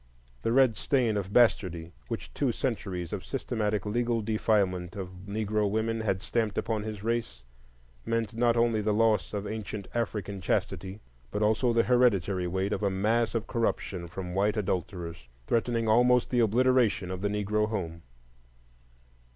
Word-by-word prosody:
The 115 - 0
red 130 -2 +4
stain 125 -6 +1
of 100 -1 -3
bastardy, 90 -8 +2 0.2
which - - -5
two - - +1
centuries 90 -2 -3
of 100 - -4
systematic 110 -6 -2
legal 115 +1 0
defilement 100 -5 0
of 95 -2 -5 0.2
Negro 105 0 0
women 110 +2 -1
had 95 -4 -1
stamped 110 -3 -1
upon 110 -2 -1
his 105 -1 -6
race, 115 - -2 0.6
meant 115 -1 -1
not 120 0 +2
only 115 -2 +2
the 105 0 +1
loss 110 -2 +2
of 105 -1 -3
ancient 105 -2 -5
African 105 -4 -3
chastity, 95 +3 -2 0.3
but 105 +10 -1
also 110 +3 +2
the 115 0 +3
hereditary 100 -7 +2
weight 95 +3 -1
of - - -2
a 100 - +2
mass 110 +5 +1
of 115 -1 -1
corruption 100 -6 -2
from 90 +1 -6
white 105 +3 +1
adulterers, 90 - -3 0.2
threatening 115 - 0
almost 125 +2 +4
the 125 - +2
obliteration 115 -4 +3
of 95 0 -4
the 100 - 0
Negro 105 +1 0
home. 85 -6 -4
105 Hz, 155 wpm, -29 LUFS, 95-115 Hz, 0.6 s, red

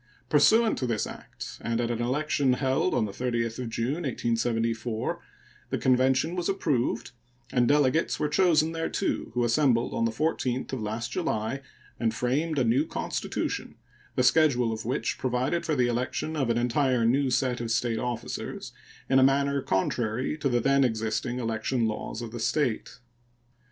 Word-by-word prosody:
Pursuant 220 +10 +4
to 125 - -1
this 115 -3 0
act, - - -9
and 115 0 -1
at 120 0 0
an 120 0 -2
election 135 +1 +1
held 135 +7 +1
on 115 - +2
the 105 - -5
30th 115 +1 -2
of 125 -2 -3
June, 125 +9 -2
1874, 115 -3 -1 0.5
the - - -1
convention 130 +6 +2
was 175 +1 -1
approved, 150 -10 0 0.4
and 125 -2 +3
delegates 145 +3 +2
were 150 - +1
chosen 160 0 +3
thereto, 165 +4 -2
who 120 - +2
assembled 120 0 +2
on 115 - +1
the 115 - +1
14th 130 -1 -1
of 130 - -2
last 110 +2 -3
July 110 +6 -2 0.4
and 115 -1 0
framed 145 +7 0
a 130 - +3
new 120 +5 +3
constitution, - - -3 0.4
the 125 - +2
schedule 125 -4 +4
of 110 0 -6
which 125 - -2
provided 130 +6 -1
for 155 - +1
the 125 -2 +3
election 125 +6 -2
of 135 -5 0
an 115 - +2
entire 125 0 +2
new 135 +3 +3
set 125 -1 0
of 115 - -3
State 115 0 0
officers 120 -1 -4 0.4
in 135 0 +4
a - - +6
manner 140 +1 +3
contrary 110 +7 -1
to 150 -3 -1
the 120 -1 +2
then 140 +3 +3
existing 110 +1 -1
election 115 +1 -1
laws 110 +1 -4
of 115 - -6
the 120 - -6
State. 125 0 -1
125 Hz, 165 wpm, -27 LUFS, 115-140 Hz, 0.5 s, a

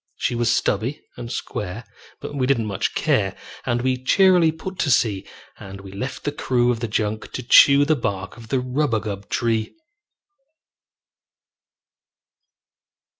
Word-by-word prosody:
She - - -1
was 120 -1 +1
stubby 115 +5 -1
and 120 -1 -7
square, 105 -2 -5 0.4
but - - -7
we 130 -3 0
didn't 125 -5 +1
much 100 -2 -2
care, - - +1 0.3
And 120 0 0
we 130 -1 -1
cheerily 180 +1 +5
put 180 +3 -8
to 155 - +1
sea; 105 -6 +1 0.3
And 95 0 -9
we 95 -1 -11
left 130 +7 -5
the 145 - -1
crew 125 -4 +1
of 120 - -2
the 115 - -3
junk 110 0 -2
to 130 - -4
chew 140 +4 +7
The 155 +1 +3
bark 100 -6 -4
of 115 -2 -13
the 135 - 0
rubagub 115 -7 -2
tree. 115 -2 -1
120 Hz, 145 wpm, -22 LUFS, 110-135 Hz, 0.4 s, chew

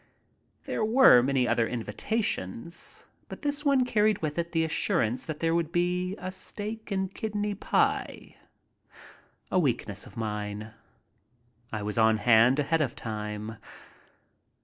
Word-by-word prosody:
There - - -2
were 220 - +7
many 130 -1 +1
other 115 -2 +2
invitations, 165 - -4 0.3
but - - -9
this 290 0 -1
one 275 -3 +3
carried 215 -3 +2
with 155 +1 -2
it 170 0 -2
the 165 -2 +1
assurance 125 -6 0
that 155 -2 -6
there 165 0 +2
would 170 -1 0
be 180 +1 0
a 185 - -5
steak 215 +3 -5
and 190 -1 -2
kidney 210 -2 -2
pie. 200 - -1 1.2
A 185 - +3
weakness 120 - -1
of - - -15
mine. 105 0 -4 1.0
I 105 -2 -3
was 105 +2 -2
on 110 0 +5
hand 115 +4 +5
ahead 155 +2 +1
of 130 -5 -1
time. 105 0 -5
160 Hz, 135 wpm, -28 LUFS, -, 1.2 s, were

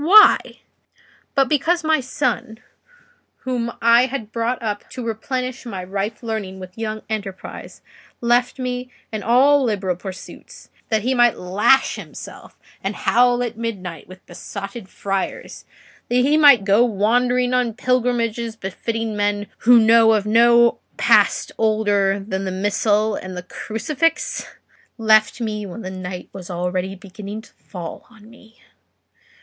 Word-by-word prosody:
Why? 415 +7 +8 1.0
but 275 -1 +3
because 330 +5 +1
my 315 0 +2
son, 255 -4 -2 0.9
whom 240 -2 -2
I 235 +2 +5
had 230 -5 -6
brought 235 +2 -1
up 210 -3 -4
to 250 -2 -7
replenish 255 +3 -4
my 195 -7 -6
ripe 200 +5 -4
learning 210 -4 -4
with 185 -1 -10
young 215 -1 -4
enterprise, 200 -3 -7 0.4
left 240 +2 +1
me 250 -1 -4 0.2
and 215 -2 -4
all 275 +4 +4
liberal 200 -6 -1
pursuits 185 +1 -11 0.2
that 220 -2 +1
he 255 +2 +1
might 240 -3 +3
lash 200 +9 +2
himself - - -11 0.3
and 195 +2 -2
howl 245 +1 +2
at 230 -2 -5
midnight 190 -7 -5
with 185 +1 -14
besotted 195 +3 -8
friars—that 195 -1 -4 0.5
he 265 +4 +3
might 285 -9 +6
go 205 +4 +5
wandering 245 +3 +1
on 245 -3 +1
pilgrimages 235 -2 0
befitting 225 +2 -4
men 205 0 0
who 240 +1 +6
know 225 0 +6
of 210 -2 +1
no 235 +2 +5 0.2
past - - +3
older 205 -3 +2
than 195 -1 -4
the 190 - -2
missal 205 +2 +1
and 185 -2 -6
the 180 - -5
crucifix?—left 225 - -1
me 215 -2 -3
when 190 +5 -8
the 185 - -5
night 185 -1 -7
was 185 -2 -9
already 180 +2 -2
beginning 200 +3 -9
to - - -20
fall 175 -4 -9
on 220 -3 -18
me." 230 -1 -19
220 Hz, 135 wpm, -21 LUFS, 195-245 Hz, 1.0 s, Why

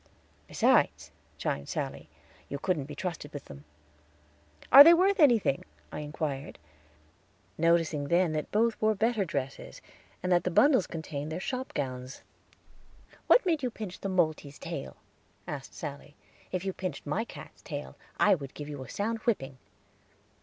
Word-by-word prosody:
"Besides," - - +2 0.3
chimed 70 - -3
Sally, - - -4 0.4
"you 140 - -3
couldn't 165 -3 -1
be 150 +1 -9
trusted 160 -3 -5
with 145 - -7
them." 70 +1 -12 1.1
"Are 275 +3 +13
they 335 +3 +8
worth 385 +3 +3
anything?" 235 - +4 0.3
I - - -5
inquired, 150 -2 -4 1.0
noticing 165 -3 +2
then 175 +1 +3
that 155 -1 -3
both 230 +2 +1
wore 215 0 +3
better 220 0 +1
dresses, 135 -4 -5 0.4
and 180 - -1
that 175 -1 +4
the - - 0
bundles 255 - +4
contained 155 -2 -5
their 160 - -3
shop 255 +6 -4
gowns. 130 -2 -4 1.0
"What - - +6
made 325 -5 +1
you 255 - -1
pinch 215 -5 -7
the 195 - -3
moltee's 155 -5 0
tail?" 65 - -6 0.5
asked 135 -2 -7
Sally. 145 -1 -7 0.4
"If 185 0 -3
you 190 - -1
pinched 185 -6 -5
my 170 +10 -1
cat's - - -12
tail, - - -7 0.2
I 205 - +6
would 140 -7 -4
give 145 - -7
you 145 -3 -6
a - - -12
sound 225 +3 -2
whipping." 135 - -2
170 Hz, 155 wpm, -29 LUFS, 145-215 Hz, 1.1 s, Are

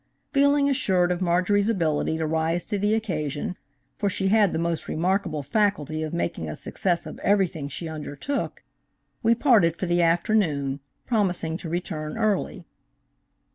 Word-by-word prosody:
Feeling 280 0 +4
assured 185 -10 +2
of 180 +1 -2
Marjorie's 185 +4 +2
ability 160 -6 0
to 160 - -1
rise 160 +2 0
to 205 -2 -2
the 205 +2 +2
occasion–for 150 -4 -4
she 195 0 -1
had 205 -3 +4
the - - -2
most 165 -1 -1
remarkable 170 -2 0
faculty 155 - 0
of 155 -1 -3
making 170 - -2
a 75 - -5
success 175 -3 -1
of - - -8
everything 180 -8 +1
she 165 +5 -6
undertook–we 160 - -4
parted 220 - +4
for 185 - -3
the 175 0 +2
afternoon, 165 -5 +1 0.3
promising 185 -8 0
to 170 - -7
return 160 -1 -4
early. 215 -3 -1
175 Hz, 140 wpm, -25 LUFS, 155-205 Hz, 0.3 s, Feeling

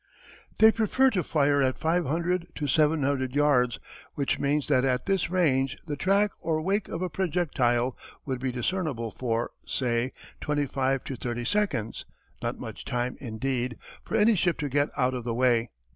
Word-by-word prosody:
They 220 0 +8
prefer 245 +4 +3
to 190 -6 +1
fire 145 -3 +2
at 130 -1 +1
500 170 +2 0
to 150 - -3
700 140 -3 +1
yards, 125 -5 +3 0.4
which 140 -2 0
means 145 +1 +1
that 125 - +3
at 130 -1 +1
this 195 -4 +1
range 135 -8 +1
the 150 -3 -3
track 200 +6 +2
or 160 -1 0
"wake" 195 +5 0
of 165 - -4
a 185 - -1
projectile 135 -9 0 0.3
would 130 -3 -2
be 130 0 -1
discernible 125 - -2
for, 115 -1 -2
say, 120 0 -1 0.3
twenty 145 -1 0
five 135 0 0
to 135 - -5
thirty 120 0 -4
seconds 130 - -1 0.4
not - - -2
much - - -7
time, 125 +1 -2
indeed, 125 0 -2 0.3
for - - -4
any 225 +2 +5
ship 175 -3 +1
to 145 - -2
get 145 +2 +1
out 130 0 +2
of 125 -2 -4
the 115 -1 -2
way. 120 -2 +2
140 Hz, 170 wpm, -27 LUFS, 125-170 Hz, 0.4 s, They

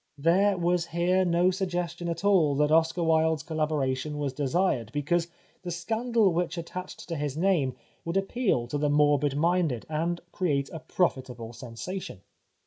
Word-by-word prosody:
There 185 +7 +3
was 175 0 +1
here 175 +3 +2
no 175 +1 +3
suggestion 180 -2 -3
at 170 +3 -4
all 170 -8 +4
that 150 +1 +2
Oscar 165 +2 +3
Wilde's 160 -1 +2
collabora 155 -5 0
tion 150 +3 -5
was 145 -3 -2
desired 140 - 0
because 155 +5 0 0.3
the 180 - -6
scandal 220 +4 +1
which 170 0 -1
at 170 - -4
tached 185 +2 -8
to 170 - -3
his 145 -1 -3
name 165 -8 +1 0.3
would 170 +3 -1
appeal 195 - 0
to 145 - -2
the 150 0 +1
morbid 145 -1 +3
minded, 165 -6 +1
and 165 +3 -1
create 140 -7 -1
a 160 - -5
profitable 130 -7 -2
sensation. 120 - -7
165 Hz, 160 wpm, -27 LUFS, 145-180 Hz, 0.3 s, all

